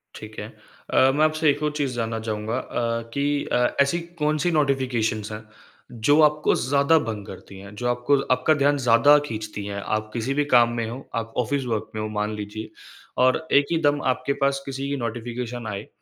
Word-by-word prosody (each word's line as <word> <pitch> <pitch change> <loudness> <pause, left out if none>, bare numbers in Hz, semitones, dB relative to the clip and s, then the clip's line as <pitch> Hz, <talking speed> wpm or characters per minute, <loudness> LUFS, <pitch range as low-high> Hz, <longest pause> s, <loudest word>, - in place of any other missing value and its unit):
ठीक - - -10
है। - - -5 0.5
अ, 130 +1 +5
मैं 150 - +3
आपसे 155 0 +2
एक 145 +1 0
और 150 - +1
चीज़ 135 -4 -1
जानना 115 -1 -2
चाहूँगा 110 +1 -3
अ, 115 -2 -2
कि 140 - -1 0.3
अ, - - +3 0.2
ऐसी 140 +5 +2 0.2
कौन-सी 155 +3 +1
नोटिफ़िकेशंस 125 -8 0
हैं, 105 +1 -7 0.5
जो 125 +6 +2
आपको 150 0 +3
ज़्यादा 140 +4 +3
भंग 110 -7 -5
करती 100 - -11
हैं, 100 +1 -11
जो 120 +3 -3
आपको 120 +3 +2 0.2
आपका 155 - +2
ध्यान 145 0 +2
ज़्यादा 125 +3 +5
खींचती 105 -4 -6
हैं। 100 0 -4
आप 110 +1 -2
किसी 120 +3 -2
भी 145 +1 +1
काम 120 -1 +6
में 115 -1 -1
हो, 120 +3 -6 0.2
आप 115 0 -3
ऑफ़िस 140 +2 -2
वर्क 110 -3 -2
में 110 - -2
हो 110 - -2
मान 105 +1 -1
लीजिए 105 +1 -6 0.6
और 130 +5 +1
एक 140 0 +5
ही 165 - +2
दम 145 0 +2
आपके 130 +2 -3
पास 140 0 +1
किसी 135 0 -4
की 140 - -1
नोटिफ़िकेशन 120 0 -5
आए, 100 0 -5
125 Hz, 200 wpm, -24 LUFS, 110-140 Hz, 0.6 s, काम